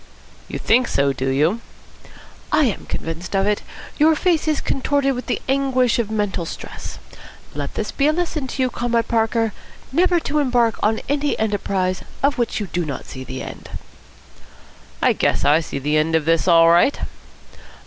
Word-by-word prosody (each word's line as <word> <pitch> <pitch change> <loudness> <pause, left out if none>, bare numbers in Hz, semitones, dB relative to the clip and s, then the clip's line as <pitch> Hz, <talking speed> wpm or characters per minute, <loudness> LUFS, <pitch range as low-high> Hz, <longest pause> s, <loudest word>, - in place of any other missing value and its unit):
'" - - -25
"You - - -5
think 245 +2 +3
so, 140 0 +1
do 135 0 -2
you?" 155 +12 +1 0.9
"I 310 - +4
am 225 - -2
convinced 165 +4 -5
of 195 0 +2
it. 210 0 +1 0.4
Your 315 +2 +5
face 325 -1 +1
is 305 -2 +2
contorted 275 0 0
with 250 0 -6
the - - -2
anguish 260 -3 +2
of 225 -3 -1
mental 205 -6 -1
stress. - - -8 0.6
Let 145 -1 -5
this 210 - -2
be 280 - +1
a - - +5
lesson 315 -4 -2
to 260 +1 -2
you, 255 - 0
Comrade 235 -1 0
Parker, 225 -1 +1 0.4
never 350 +4 +3
to 300 0 0
embark 245 -5 +2
on 220 +1 +1
any 290 +1 0
enterprise 195 -3 -1 0.2
of 280 -1 +2
which 235 -2 0
you 210 - -2
do 175 -1 -2
not 145 -4 -5
see 130 - -8
the 130 +1 -6
end." - - -9 1.3
"I - - +5
guess - - +1
I 145 +3 +5
see 155 - -5
the 150 +3 0
end 160 +1 +2
of 160 -2 +1
this 165 +2 +2
all 165 -1 +6
right." 175 +12 +4
220 Hz, 180 wpm, -21 LUFS, 165-270 Hz, 1.3 s, all